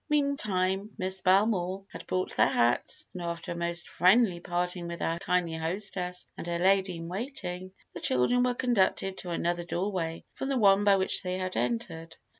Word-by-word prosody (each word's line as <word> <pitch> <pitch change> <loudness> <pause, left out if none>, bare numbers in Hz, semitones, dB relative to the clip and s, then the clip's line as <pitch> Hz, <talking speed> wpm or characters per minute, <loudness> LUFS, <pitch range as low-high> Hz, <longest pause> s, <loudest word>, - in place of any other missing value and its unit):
Meantime, 210 -10 +1
Miss 190 -1 0
Belmore 190 -1 +2
had - - -10
brought 185 0 -2
their - - +5
hats, 120 0 +1
and 180 - -6
after 170 0 -4
a - - -3
most 170 0 -1
friendly 185 +1 +4
parting 175 0 -2
with 170 0 -5
their 165 0 -1
kindly 175 -2 0
hostess 180 +2 -3
and - - -7
her 170 0 -1
lady 190 0 +3
in 165 0 -7
waiting, 185 -3 -4 0.2
the - - -6
children 130 - +3
were 250 0 +1
conducted 195 -6 +1
to 180 - -6
another 175 0 -1
doorway 175 -2 -3
from 270 - -4
the 270 - +1
one 200 -3 +5
by 200 -1 +5
which 190 -1 +1
they 180 0 -3
had 185 0 -3
entered. 165 -9 -3
185 Hz, 180 wpm, -29 LUFS, 170-195 Hz, 0.2 s, their